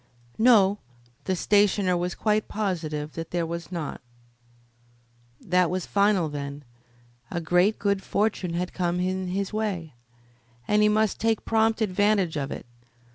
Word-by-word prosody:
No, 210 -4 +5 0.5
the 190 - 0
stationer 200 -1 +2
was 175 0 -2
quite 215 -1 0
positive 160 -8 -3
that 165 0 -6
there 175 -1 -1
was 170 +2 -6
not. 165 -5 -5 1.4
That 180 -1 +2
was 185 0 -2
final, 200 -4 +2
then. 145 -1 -6 0.7
A 175 - -2
great 180 +5 +2
good 200 -1 0
fortune 195 -5 -1
had 180 +1 -3
come 175 -1 -1
in 185 +1 -1
his 195 +3 -3
way, 195 -8 -3 0.7
and 210 0 +3
he 210 - +5
must 215 -1 +1
take 225 -1 0
prompt 225 0 +2
advantage 200 -3 +1
of 140 -2 -2
it. - - -7
185 Hz, 140 wpm, -26 LUFS, 170-210 Hz, 1.4 s, No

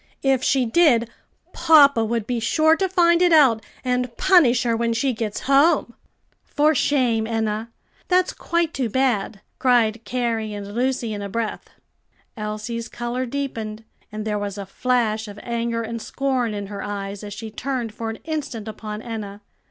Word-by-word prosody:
If 270 -2 +2
she 260 -2 +2
did, 235 -4 +3 0.4
papa 280 -7 +6
would 225 -1 -1
be 245 0 -2
sure 315 +8 +3
to 380 +2 -1
find 345 -2 +4
it 355 -1 +4
out 265 -9 +5 0.2
and 250 -1 -1
punish 305 -11 +4
her 235 -2 +1
when 230 0 0
she 255 +3 0
gets 220 -2 -4
home." 275 -1 +3 0.5
"For 305 +2 +2
shame, 245 -6 +1
Enna! 220 0 -2 0.4
that's 365 0 +2
quite 340 -1 -1
too 255 -4 -1
bad!" 225 -5 0 0.2
cried 235 -3 +2
Carrie 230 -4 -2
and 205 0 -7
Lucy 245 -1 -1
in 205 - -5
a 200 - -5
breath. 225 +1 -4 0.7
Elsie's 220 +2 -4
color 240 +2 -3
deepened, 225 -5 -4 0.3
and 215 0 -5
there 210 -1 -1
was 205 -1 -4
a 200 - -5
flash 220 0 0
of 205 0 -10
anger 235 -1 -2
and 230 0 -5
scorn 255 -4 -1
in 205 -1 -4
her 200 0 -7
eyes 200 0 -5
as 205 -1 -7
she 220 0 -7
turned 245 -1 -3
for 225 0 -5
an 225 - -5
instant 280 -8 -4
upon 215 0 -6
Enna. 210 -3 -6
235 Hz, 165 wpm, -22 LUFS, 215-265 Hz, 0.7 s, papa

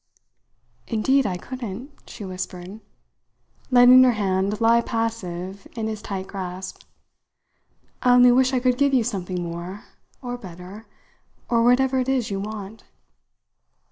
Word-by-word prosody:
"Indeed 260 +4 +2
I 180 -2 -2
couldn't," 250 +3 -7 0.2
she 205 - -8
whispered, 185 +1 -7 0.9
letting 250 0 +8
her 250 -1 +4
hand 195 -1 -1
lie 230 +1 +4
passive 200 -5 -4
in 225 -2 -3
his 215 -1 -4
tight 195 -3 -5
grasp. 185 -1 -7 1.2
"I 245 0 +5
only 245 0 +7
wish 260 +1 +3
I 260 - +1
could 250 0 +1
give 280 -1 +3
you 245 - +3
something 185 -5 -3
more, 170 +4 -6 0.4
or 245 -1 -6
better, 185 +3 -11 0.6
or 235 -1 +3
whatever 260 +2 +3
it 255 +1 -1
is 255 -5 0
you 195 - -2
want." 210 +1 -7
220 Hz, 135 wpm, -23 LUFS, 190-245 Hz, 1.2 s, letting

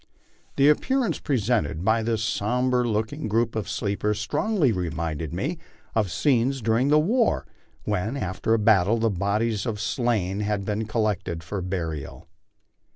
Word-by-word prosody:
The 140 - +4
appearance 255 - +2
presented 105 - 0
by 110 +1 +3
this 110 -1 -1
sombre 125 +3 +1
looking 110 +5 -2
group 115 +2 0
of 110 -1 -3
sleepers 105 0 -1
strongly 150 - +1
reminded 80 -4 -3
me 145 - -3 0.3
of 105 -4 +1
scenes 135 - +1
during 115 +4 +1
ths 150 - +5
war 220 +10 +2 0.4
when, 105 +5 -1
after 95 +1 0
a - - +2
battle, 105 -1 +4
the 115 -1 +1
bodies 100 +3 0
of 115 - -1
the 105 - -7
slain 110 -6 0
had 105 -1 -1
been 105 +1 -2
collected 105 -7 -1
for 95 +4 -4
burial. 85 -5 -4
110 Hz, 150 wpm, -25 LUFS, 100-125 Hz, 0.4 s, ths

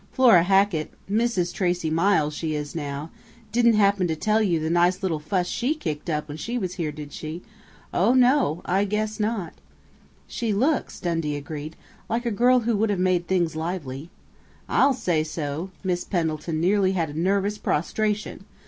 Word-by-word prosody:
"Flora 235 -9 +6
Hackett 190 -3 +2 0.2
Mrs. 205 -4 0
Tracey 175 -4 0
Miles 165 -3 +2
she 155 0 -3
is 150 -1 -4
now 145 0 -5 0.4
didn't 235 0 +4
happen 200 -3 +3
to 160 - -1
tell 215 +7 +1
you 175 -6 +2
the 155 - -2
nice 175 +3 +2
little 165 -5 0
fuss 180 +4 -1
she 250 - -1
kicked 155 - -4
up 150 -1 -1
when 150 0 -7
she 235 +9 -3
was 185 -6 -3
here, 165 -5 -3
did 150 -1 -9
she? 160 +3 -6 0.5
Oh, 220 +8 +3
no! 250 - +3
I 190 +3 +2
guess 210 +1 -2
not!" 210 -5 -2 0.7
"She 230 -3 -2
looks," 265 +8 0
Dundee 165 -4 -1
agreed, 150 +2 -6 0.3
"like 235 +2 -1
a 235 - 0
girl 245 +4 +4
who 230 0 0
would 220 +1 +1
have 205 - 0
made 180 -1 +1
things 175 -4 +1
lively." 160 -3 -4 0.6
"I'll 275 -1 +3
say 170 -10 0
so! 155 +2 -4
Miss 180 -2 -1
Pendleton 160 -3 -2
nearly 190 +2 +2
had 165 -5 -2
nervous 200 +5 0
prostration!" 210 +7 -1
180 Hz, 170 wpm, -24 LUFS, 160-210 Hz, 0.7 s, Flora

